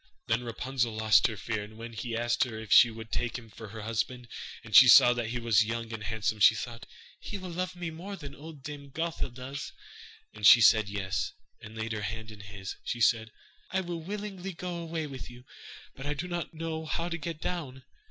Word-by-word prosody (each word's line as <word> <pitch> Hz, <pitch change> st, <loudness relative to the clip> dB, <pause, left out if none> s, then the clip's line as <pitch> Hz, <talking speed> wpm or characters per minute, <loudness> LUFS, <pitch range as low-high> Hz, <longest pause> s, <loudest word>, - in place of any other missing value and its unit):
Then 115 Hz, +2 st, +1 dB
Rapunzel 120 Hz, 0 st, -2 dB
lost 110 Hz, -4 st, +5 dB
her 110 Hz, -, -6 dB
fear, 110 Hz, 0 st, -3 dB
and 110 Hz, +1 st, -12 dB
when 115 Hz, +1 st, -8 dB
he 115 Hz, +1 st, -3 dB
asked 120 Hz, 0 st, +2 dB
her 115 Hz, -3 st, -7 dB
if 110 Hz, -1 st, -9 dB
she 120 Hz, -, +9 dB
would 115 Hz, 0 st, -9 dB
take 120 Hz, -1 st, -1 dB
him 115 Hz, -3 st, -12 dB
for 110 Hz, +2 st, -9 dB
her 110 Hz, +1 st, -8 dB
husband, 115 Hz, +3 st, -2 dB, 0.4 s
and 110 Hz, -4 st, -4 dB
she 130 Hz, -, +11 dB
saw 120 Hz, +1 st, +9 dB
that 120 Hz, -2 st, -2 dB
he 120 Hz, +2 st, -3 dB
was 115 Hz, -2 st, +4 dB
young 115 Hz, +1 st, -4 dB
and 110 Hz, -1 st, -5 dB
handsome, 110 Hz, 0 st, -1 dB
she -, -, +7 dB
thought: 120 Hz, -1 st, -6 dB, 0.3 s
'He 205 Hz, -, -5 dB
will 185 Hz, -2 st, -7 dB
love 180 Hz, +2 st, -3 dB
me 175 Hz, -2 st, -4 dB
more 185 Hz, +5 st, -7 dB
than 145 Hz, -6 st, -9 dB
old 150 Hz, -1 st, -11 dB
Dame 145 Hz, 0 st, -8 dB
Gothel 165 Hz, 0 st, -3 dB
does'; 130 Hz, +3 st, -6 dB, 0.6 s
and 105 Hz, -2 st, +3 dB
she 120 Hz, -, +10 dB
said 110 Hz, -1 st, +6 dB
yes, 95 Hz, -3 st, -2 dB, 0.3 s
and 110 Hz, +1 st, -10 dB
laid 110 Hz, +1 st, -3 dB
her 110 Hz, -1 st, -2 dB
hand 110 Hz, +2 st, -5 dB
in 105 Hz, -, -12 dB
his. 100 Hz, -1 st, -8 dB
She 120 Hz, -, -3 dB
said: 115 Hz, -1 st, +3 dB, 0.4 s
'I 190 Hz, -, 0 dB
will 170 Hz, -2 st, -5 dB
willingly 195 Hz, 0 st, -5 dB
go 175 Hz, +1 st, -5 dB
away 165 Hz, -1 st, -3 dB
with 135 Hz, -4 st, -8 dB
you, 120 Hz, 0 st, -13 dB, 0.5 s
but 135 Hz, +1 st, -8 dB
I 145 Hz, -, -1 dB
do 165 Hz, +5 st, -4 dB
not 175 Hz, -2 st, -3 dB
know 160 Hz, -1 st, -4 dB
how 170 Hz, +2 st, -1 dB
to 170 Hz, -1 st, -3 dB
get 160 Hz, 0 st, -5 dB
down. 145 Hz, -7 st, -4 dB
120 Hz, 220 wpm, -29 LUFS, 110-160 Hz, 0.6 s, she